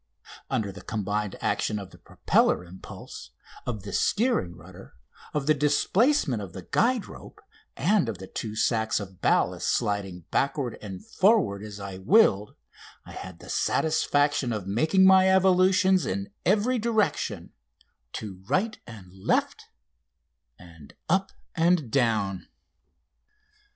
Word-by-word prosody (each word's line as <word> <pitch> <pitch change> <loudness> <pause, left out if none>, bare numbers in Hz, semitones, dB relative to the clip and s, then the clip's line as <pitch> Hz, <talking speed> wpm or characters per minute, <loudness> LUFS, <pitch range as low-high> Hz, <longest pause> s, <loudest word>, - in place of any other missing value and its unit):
Under 100 -3 -1
the 100 0 -11
combined 105 -1 -3
action 105 - -1
of 100 -2 -8
the - - -16
propeller 90 - +1
impulse, 90 +2 -11 0.4
of 110 -6 -4
the 100 -2 -7
steering 205 - +1
rudder, 90 +4 -14 0.4
of 150 -2 -2
the 155 - +4
displacement 150 - +2
of 95 -4 -8
the 95 - -8
guide 235 - +1
rope, - - -13 0.4
and 190 - +2
of 105 - -4
the 95 - -9
two 110 +3 -6
sacks 110 -1 +1
of 95 -3 -10
ballast - - +1
sliding 100 -3 -1
backward 135 -3 -1
and 95 -3 -8
forward 190 - +2
as 105 -1 -8
I 100 -1 -7
willed, 105 - +3 0.5
I - - -12
had 95 -2 -9
the - - -14
satisfaction 145 -4 +1
of 105 -4 -3
making 155 - +3
my 190 0 +6
evolutions 190 0 +4
in 100 +1 -3 0.2
every 215 +6 +2
direction 210 - -1 0.6
to 95 -4 -7
right 215 +4 0
and 100 -6 -12
left, 95 0 -1 0.9
and 85 -5 -15 0.2
up 190 +1 +1 0.2
and 165 -7 +1
down. 110 -7 0
110 Hz, 130 wpm, -26 LUFS, -, 0.9 s, my